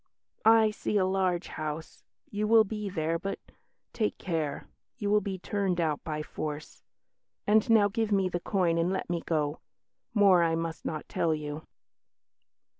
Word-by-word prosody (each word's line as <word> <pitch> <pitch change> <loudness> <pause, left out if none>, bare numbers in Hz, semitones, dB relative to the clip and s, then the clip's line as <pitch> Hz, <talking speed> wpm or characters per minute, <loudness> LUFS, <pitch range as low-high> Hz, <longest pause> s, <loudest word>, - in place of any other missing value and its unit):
"I 220 -1 +6
see 210 0 -1
a 190 - +3
large 185 -2 0
house; 155 +1 -6 0.3
you 210 +1 -1
will 225 0 +7
be 210 -1 -4
there, 165 -2 -1
but 195 +2 -3 0.6
take 215 -3 -1
care; 160 -5 -3 0.3
you 205 -4 -1
will 210 0 +4
be 195 -1 -4
turned 190 -1 -1
out 155 -3 0
by 150 -1 -3
force.... 150 0 -6 0.6
And 215 +2 +3
now 220 -3 +6
give 220 +1 -1
me 195 -2 +3
the 175 -1 -2
coin 175 -3 +1
and 170 +2 +1
let 190 -2 -2
me 170 -1 -1
go. 150 -2 -1 0.6
More 195 -4 +6
I 165 -1 +2
must 165 0 -4
not 155 -2 -4
tell 160 -2 +1
you." 150 0 -6
180 Hz, 165 wpm, -29 LUFS, 160-205 Hz, 0.6 s, will